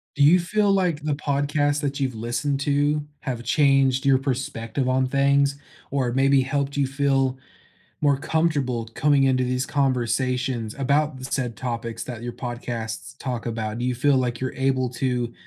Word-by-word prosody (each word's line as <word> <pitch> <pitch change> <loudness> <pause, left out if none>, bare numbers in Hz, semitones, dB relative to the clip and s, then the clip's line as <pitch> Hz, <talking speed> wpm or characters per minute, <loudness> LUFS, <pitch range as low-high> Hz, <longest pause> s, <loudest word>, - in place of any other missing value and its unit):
Do 145 - +2
you 175 +5 +6
feel 205 +3 +1
like 180 -6 +1
the 150 -1 0
podcasts 145 0 0
that 140 0 -2
you've 130 -3 -1
listened 120 +5 -2
to 145 +1 +1
have 125 -4 -4
changed 135 -3 +3
your 135 -1 +5
perspective 130 -2 -2
on 130 0 +2
things, 140 +1 +2 0.3
or 130 -3 0
maybe 135 +1 +4
helped 140 +1 -2
you 140 - +2
feel 135 -1 +1 0.6
more 140 -2 +3
comfortable 140 -7 0
coming 145 0 +3
into 130 -1 +3
these 125 +1 -1
conversations 125 -3 0
about 140 +1 +1
the 130 - -7
said 125 -3 -2
topics 115 -2 -4
that 120 -3 -7
your 120 0 -5
podcasts 115 -5 -5
talk 125 -3 -4
about? 110 -1 -3
Do 120 - -1
you 125 -1 0
feel 140 +2 +3
like 120 -2 -1
you're 130 0 -3
able 130 -1 0
to 125 -2 -1
135 Hz, 165 wpm, -24 LUFS, 125-140 Hz, 0.6 s, you